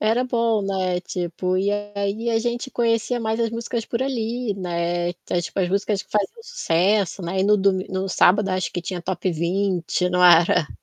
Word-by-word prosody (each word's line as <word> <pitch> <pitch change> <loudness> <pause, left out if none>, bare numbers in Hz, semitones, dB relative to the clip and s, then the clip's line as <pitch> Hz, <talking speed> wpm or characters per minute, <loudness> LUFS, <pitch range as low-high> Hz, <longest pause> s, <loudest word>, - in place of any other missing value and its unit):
Era 225 +3 +2
bom, 230 -4 +1
né, 185 -2 -1
tipo, 180 +1 -3
e 200 +2 +1 0.2
aí 205 +4 -1
a 225 - +2
gente 240 +3 -3
conhecia 230 +1 0
mais 220 0 -1
as 230 - +1
músicas 230 0 -3
por 235 - -3
ali, 240 -4 -2
né, 175 -1 -2 0.3
tipo 185 - -6
as 180 -2 +1
músicas 200 +1 0
que - - -35
faziam 210 - -1
sucesso, 195 - 0
né, 185 +2 -2
e - - +3
no 210 +1 +5
do 195 0 +3
no 190 0 -3
sábado 195 +2 +4
acho 185 -1 -1
que 175 - -3
tinha 175 0 -5
Top 185 +1 -2
20 180 +1 0
não 180 0 +2
era? 170 -2 +5
195 Hz, 190 wpm, -22 LUFS, 180-225 Hz, 0.3 s, no